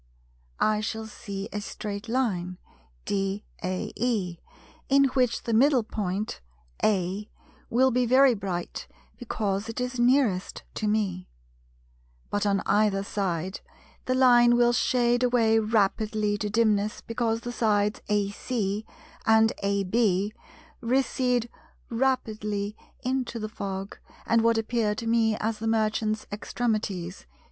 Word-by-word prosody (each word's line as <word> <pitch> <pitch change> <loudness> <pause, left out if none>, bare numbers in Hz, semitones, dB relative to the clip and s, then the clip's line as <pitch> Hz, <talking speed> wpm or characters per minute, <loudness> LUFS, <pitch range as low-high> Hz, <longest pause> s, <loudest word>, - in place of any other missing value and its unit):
I 215 0 +2
shall 220 +1 -3
see 200 -2 -6
a 205 - -2
straight 205 +1 -6
line 190 -8 -1 0.5
DAE, 195 +1 -1 1.5
in 275 0 +6
which 250 -3 +1
the 230 - -2
middle 260 +1 +4
point 205 - -3 0.4
(A) 195 0 0 0.4
will 260 +3 +4
be 250 0 +2
very 260 +1 +6
bright 190 -5 -4 0.3
because 210 -3 -2
it 225 - -4
is 250 0 -3
nearest 240 -7 +2
to 215 - -2
me; 200 -4 -1 1.0
but 205 0 0
on 200 -1 +1
either 200 -1 +2
side 190 -3 -2 0.5
the 255 - +1
line 240 -2 +6
will 240 0 +4
shade 240 0 +2
away 235 -3 +3
rapidly 215 0 +1
into 205 0 -2
dimness, 210 -1 +1
because 230 -1 -1
the 240 - -5
sides 210 -3 +1
AC 205 +1 -1 0.4
and 220 0 +5
AB 200 0 +1 0.5
recede 250 -1 +1 0.4
rapidly 215 -5 -1 0.3
into 255 -2 -1
the 215 -1 -3
fog; 195 -2 -5 0.3
and 230 0 +3
what 230 0 +3
appear 225 -1 0
to 230 - -5
me 225 -1 +2
as 220 0 -2
the 225 - -3
Merchant's 215 -1 0
extremities, 205 -5 -2
viz. - - -19
215 Hz, 120 wpm, -27 LUFS, 200-240 Hz, 1.5 s, in